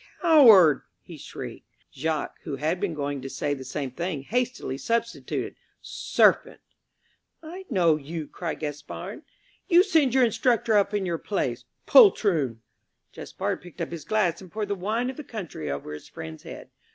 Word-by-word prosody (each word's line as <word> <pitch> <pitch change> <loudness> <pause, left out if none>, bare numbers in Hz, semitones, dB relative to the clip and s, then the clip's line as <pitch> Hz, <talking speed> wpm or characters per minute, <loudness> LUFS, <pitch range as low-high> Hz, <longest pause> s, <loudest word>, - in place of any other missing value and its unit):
"Coward!" 230 - +7 0.2
he - - -11
shrieked. - - -9 0.3
Jacques, 155 +2 -3
who 150 -4 -5
had 155 +6 -1
been 180 -5 -2
going 145 -2 -3
to 135 - -6
say 145 +2 -2
the 135 -2 -6
same 135 -1 -4
thing, 170 0 -4
hastily 245 - -2
substituted 230 - -2 0.3
"Serpent!" - - +2 0.8
"I 360 +4 -9
know 170 - +3
you," 155 +1 -6
cried 170 -3 -5
Gaspard. 145 -1 -6 0.5
"You 355 -1 +6
send 315 - +2
your 260 -2 +6
instructor 230 -1 +1
up 205 0 +2
in 200 -2 0
your 170 -2 -2
place. 205 - -2 0.2
Poltroon!" 165 - +5 0.5
Jacques - - -4
picked 175 0 -14
up 170 - -3
his 170 -2 -6
glass 190 -6 0
and 185 -3 -13
poured 210 -1 -4
the - - +1
wine 220 +7 -1
of - - -15
the 300 - -6
country 180 - -6
over 70 +2 -5
his 75 - -9
friend's 80 0 -9
head. - - -10
180 Hz, 165 wpm, -26 LUFS, 145-230 Hz, 0.8 s, Coward